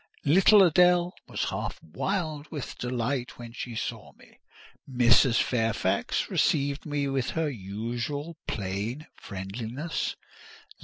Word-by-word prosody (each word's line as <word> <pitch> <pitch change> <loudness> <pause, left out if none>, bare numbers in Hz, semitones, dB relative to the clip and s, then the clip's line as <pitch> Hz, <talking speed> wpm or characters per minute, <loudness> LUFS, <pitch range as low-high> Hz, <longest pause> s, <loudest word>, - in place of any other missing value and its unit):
Little 190 +7 +7
Adèle 180 0 +5 0.2
was - - -2
half - - -3
wild 155 - -3
with 150 -5 -6
delight 125 +1 -2
when 120 -1 -9
she 120 -1 -6
saw - - -5
me. - - -21 0.5
Mrs. 125 -1 +5
Fairfax 110 -5 0
received 140 +1 +1
me 145 -1 -1
with 135 -2 -1
her 160 -2 +1
usual 120 - -4
plain 110 +3 -3
friendliness. 110 - -4
130 Hz, 110 wpm, -28 LUFS, 115-155 Hz, 0.5 s, Little